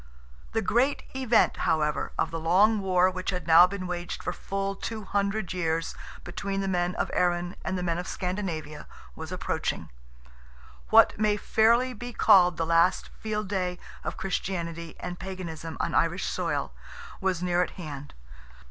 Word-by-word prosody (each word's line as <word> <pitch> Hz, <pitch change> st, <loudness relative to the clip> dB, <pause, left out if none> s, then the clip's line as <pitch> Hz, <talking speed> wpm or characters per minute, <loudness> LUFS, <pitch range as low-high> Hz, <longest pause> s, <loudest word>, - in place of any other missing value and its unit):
The 225 Hz, 0 st, 0 dB
great 255 Hz, +8 st, +2 dB
event, 245 Hz, -4 st, +3 dB
however, 150 Hz, -2 st, 0 dB
of -, -, 0 dB
the 165 Hz, -, -3 dB
long 195 Hz, +7 st, +4 dB
war 185 Hz, -1 st, +3 dB
which 185 Hz, 0 st, -4 dB
had 180 Hz, -4 st, -2 dB
now 170 Hz, +2 st, +8 dB
been 190 Hz, 0 st, -5 dB
waged 175 Hz, -1 st, -4 dB
for 180 Hz, -, -2 dB
full 195 Hz, +1 st, -3 dB
two 220 Hz, +2 st, -5 dB
hundred 200 Hz, -1 st, -1 dB
years 165 Hz, -2 st, -1 dB, 0.3 s
between 195 Hz, +2 st, -3 dB
the 195 Hz, -, -2 dB
men 180 Hz, -1 st, 0 dB
of -, -, -2 dB
Erin 175 Hz, 0 st, +1 dB
and 190 Hz, -, -2 dB
the 180 Hz, -, -3 dB
men 170 Hz, -1 st, 0 dB
of 180 Hz, -, -5 dB
Scandinavia 175 Hz, -6 st, -4 dB, 0.3 s
was 160 Hz, +1 st, -7 dB
approaching. 185 Hz, -, -3 dB, 1.0 s
What -, -, +6 dB
may 210 Hz, -1 st, +2 dB
fairly 235 Hz, +5 st, +3 dB
be 245 Hz, +2 st, -7 dB
called 180 Hz, -6 st, +5 dB
the 165 Hz, -, 0 dB
last 170 Hz, +3 st, +3 dB
field 215 Hz, -1 st, -4 dB
day 180 Hz, -3 st, -1 dB, 0.3 s
of -, -, -4 dB
Christianity 170 Hz, -3 st, -3 dB
and 180 Hz, 0 st, -6 dB
Paganism 170 Hz, -4 st, -6 dB
on -, -, -1 dB
Irish -, -, +1 dB
soil, -, -, -2 dB, 0.5 s
was 185 Hz, -2 st, -1 dB
near 180 Hz, 0 st, +2 dB
at 180 Hz, -, 0 dB
hand. 145 Hz, -5 st, -8 dB
180 Hz, 160 wpm, -27 LUFS, 170-200 Hz, 1.0 s, now